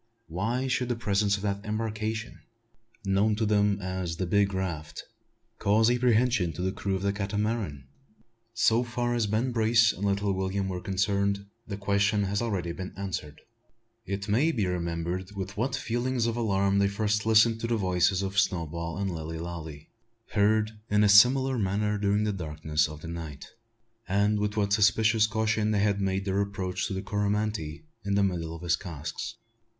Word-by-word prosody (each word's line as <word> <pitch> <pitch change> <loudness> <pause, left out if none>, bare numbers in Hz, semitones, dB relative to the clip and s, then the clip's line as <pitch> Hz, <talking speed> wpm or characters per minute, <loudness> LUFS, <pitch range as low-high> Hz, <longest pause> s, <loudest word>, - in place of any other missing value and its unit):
Why 110 +10 -2
should 125 -1 0
the 120 - +1
presence 100 -2 +1
of 100 - -9
that 100 -1 -2
embarkation 110 +1 -3 0.7
known 100 +2 +2
to 110 +1 0
them 105 -1 +2
as 95 -3 -3
the 95 - -1
"big 100 +2 +2
raft" 85 -5 -4 0.6
cause 110 +3 +3
apprehension 120 -6 +2
to 90 +4 -5
the 95 - 0
crew 100 0 -2
of 95 - -3
the 100 0 +1
Catamaran? 100 - -2 0.7
So 115 +1 +3
far 120 0 -2
as 115 -3 +1
Ben 110 +5 0
Brace 115 -1 +4
and 95 - -7
little 100 0 +1
William 95 +1 -1
were 90 -1 -4
concerned, 100 +1 0 0.2
the 100 -3 -4
question 100 +1 +1
has 100 +1 -1
been 120 - -1
already 90 -6 -2 0.2
answered. 90 -7 -5 0.6
It 100 0 -4
may 125 +11 +3
be 110 -9 0
remembered 90 +2 -3
with 100 0 -5
what 125 +5 -1
feelings 120 0 -1
of 115 -1 0
alarm 100 -4 +1
they 100 - +4
first 105 +1 -1
listened 110 +1 +5
to 115 - -1
the 115 -1 +1
voices 90 0 +2
of 100 +1 0
Snowball 85 -3 -1
and 100 -1 -1
Lilly 80 -1 -5
Lalee, 80 -3 -7 0.4
heard 110 +1 +2 0.2
in 105 0 +3
a 105 - +4
similar 130 +5 +6
manner 105 +1 0
during 100 +1 +1
the 105 -1 0
darkness 75 -3 -1
of 75 0 -9
the - - -8
night, 80 -4 -7 0.6
and 105 +2 +2
with 105 +1 -2
what 100 -1 +1
suspicious 110 +2 +4
caution 110 0 0
they 105 -2 +2
had 100 -1 +1
made 95 0 -1
their 100 0 +1
approach 95 -1 -2
to - - -4
the 95 - -4
Coromantee 105 -5 -2 0.2
in 100 -1 0
the 100 - +3
middle 85 -4 -2
of 85 - -10
his 85 -1 +2
casks. 80 -6 -6
100 Hz, 175 wpm, -28 LUFS, 95-110 Hz, 0.7 s, similar